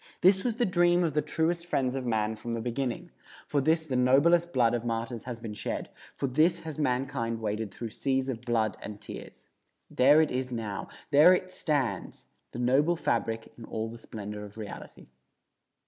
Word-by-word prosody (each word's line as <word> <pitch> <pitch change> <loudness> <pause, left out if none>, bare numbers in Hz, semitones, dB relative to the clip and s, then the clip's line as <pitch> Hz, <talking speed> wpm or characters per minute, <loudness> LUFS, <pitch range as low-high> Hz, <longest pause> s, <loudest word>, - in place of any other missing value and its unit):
This 190 +1 +5
was 240 -3 0
the 240 0 +1
dream 175 -2 +3
of 160 -4 0
the 150 - +2
truest 165 +3 -1
friends 130 -6 0
of 130 -2 -3
man 110 -1 0
from 115 +2 -4
the - - -3
beginning; 120 +2 -3 0.3
for 145 - 0
this 160 +3 +2
the 135 -4 -3
noblest 150 +8 +4
blood 120 -5 +3
of 120 -1 -1
martyrs 115 0 -3
has 120 -2 -5
been 115 -2 -6
shed; 105 - -4 0.3
for - - -2
this 155 +6 +2
has 155 -2 -7
mankind 125 -4 -1
waded 105 -1 -2
through 115 +2 -6
seas 135 +2 0
of 125 -4 -3
blood 115 -4 0
and 105 -1 -7
tears. 105 - -10 0.4
There 140 +4 +6
it 160 - +3
is 130 0 -2
now; 110 -4 -4 0.2
there 155 +6 +8
it 185 0 -4
stands, 145 -8 -2 0.3
the - - -8
noble 135 +8 +3
fabric 115 -6 -1
in - - -9
all 110 0 -4
the 115 +1 -10
splendor 105 -2 -7
of 105 +1 -11
reality. 105 -2 -9
125 Hz, 190 wpm, -29 LUFS, 115-155 Hz, 0.4 s, there